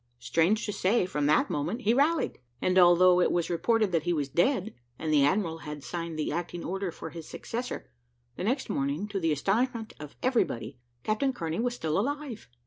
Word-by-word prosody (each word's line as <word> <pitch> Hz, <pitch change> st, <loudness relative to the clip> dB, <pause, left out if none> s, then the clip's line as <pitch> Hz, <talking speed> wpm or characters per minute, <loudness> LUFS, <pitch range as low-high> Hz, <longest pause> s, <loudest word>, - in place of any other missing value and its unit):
Strange 165 Hz, -, +1 dB
to 210 Hz, -, -3 dB
say, 195 Hz, +2 st, +2 dB
from 150 Hz, -5 st, -1 dB
that 150 Hz, -, +4 dB
moment 170 Hz, -, -2 dB
he 220 Hz, +1 st, +3 dB
rallied; 300 Hz, +6 st, +1 dB, 0.2 s
and 185 Hz, 0 st, +3 dB
although 180 Hz, 0 st, +6 dB
it -, -, +3 dB
was 175 Hz, 0 st, 0 dB
reported 215 Hz, +4 st, +2 dB
that 165 Hz, -2 st, +2 dB
he 175 Hz, +3 st, 0 dB
was 145 Hz, -4 st, -1 dB
dead, 215 Hz, -, +1 dB, 0.2 s
and 155 Hz, -1 st, -2 dB
the 145 Hz, -2 st, +5 dB
admiral 165 Hz, +1 st, +1 dB
had 150 Hz, -2 st, -7 dB
signed 170 Hz, -1 st, -5 dB
the 155 Hz, -, -1 dB
acting 175 Hz, +1 st, -4 dB
order 190 Hz, 0 st, -2 dB
for 160 Hz, -, -8 dB
his 165 Hz, 0 st, -9 dB
successor, 245 Hz, +2 st, -5 dB, 0.5 s
the -, -, -5 dB
next 255 Hz, +7 st, 0 dB
morning, 140 Hz, +8 st, -1 dB
to 200 Hz, -2 st, -3 dB
the 165 Hz, -3 st, +1 dB
astonishment 225 Hz, -, 0 dB
of 150 Hz, -1 st, -9 dB
everybody, 145 Hz, -, 0 dB, 0.2 s
Captain 220 Hz, +6 st, +1 dB
Kearney 165 Hz, -7 st, -3 dB
was 245 Hz, +1 st, 0 dB
still 160 Hz, -5 st, -1 dB
alive. 280 Hz, -, -3 dB
180 Hz, 195 wpm, -28 LUFS, 160-225 Hz, 0.5 s, although